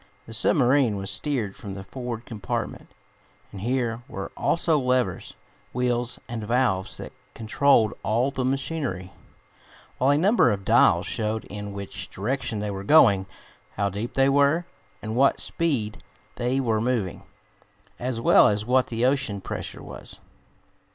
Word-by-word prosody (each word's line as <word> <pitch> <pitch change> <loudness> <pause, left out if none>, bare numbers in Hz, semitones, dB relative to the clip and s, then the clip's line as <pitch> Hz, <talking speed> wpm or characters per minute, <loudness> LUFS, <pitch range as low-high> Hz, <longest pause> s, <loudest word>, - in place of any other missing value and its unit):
The 115 - -9
submarine 125 0 +3
was 95 0 -3
steered 110 -1 -2
from 105 -8 -8
the 95 - -7
forward 120 +1 -6
compartment, 110 -4 -5 0.6
and 95 - -8
here 120 0 -1
were 95 - -6
also 165 -2 +1
levers, 125 -8 -1 0.4
wheels 125 -1 -1
and 115 -2 -5
valves 105 -5 0
that - - -8 0.2
controlled 115 -1 +3
all 120 +5 +1
the 130 -1 -2
machinery, 130 - -2 0.9
while 130 - +3
a 145 - +4
number 190 - +4
of 100 -3 -2
dials 105 -6 +4
showed 110 -1 -2
in 105 0 -7
which 100 -1 -5
direction 110 0 -2
they 105 -1 -2
were 95 0 -5
going, 100 -8 +5 0.5
how 100 0 0
deep 110 +6 -5
they 135 0 +4
were, 145 +5 +3 0.4
and 110 - -4
at - - -3
what 135 +1 +4
speed 130 -11 -1 0.3
they 125 +2 -1
were 115 -5 +1
moving, 115 -7 -1 0.8
as 125 -1 -2
well - - +6
as 105 +1 0
what 125 +2 +3
the 115 +1 -1
ocean 130 -6 +1
pressure - - -6
was. - - -9
115 Hz, 150 wpm, -25 LUFS, 105-130 Hz, 0.9 s, well